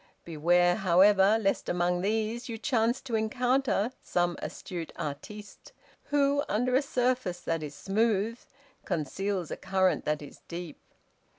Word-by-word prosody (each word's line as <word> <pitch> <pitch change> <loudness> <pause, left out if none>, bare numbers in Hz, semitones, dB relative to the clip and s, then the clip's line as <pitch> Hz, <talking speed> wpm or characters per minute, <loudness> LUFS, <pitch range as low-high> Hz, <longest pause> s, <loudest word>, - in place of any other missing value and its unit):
Beware, 175 +2 +3
however, 195 +2 +5
lest 195 -3 0
among 175 0 +1
these 220 +4 -1
you 225 - -4
chance 235 0 +1
to 255 -3 -8
encounter 245 +1 +1
some 175 -1 0
astute 175 -5 -6
artiste, 205 +8 -8 0.3
who, 285 0 +2
under 245 +4 +1
a 265 - +4
surface 250 -9 -1
that 165 -1 -2
is 150 -1 -6
smooth, 220 +2 0 0.4
conceals 180 +2 -2
a - - -3
current 190 -1 +1
that 150 0 -1
is 145 - -12
deep. 170 -1 -7
200 Hz, 130 wpm, -29 LUFS, 175-235 Hz, 0.4 s, however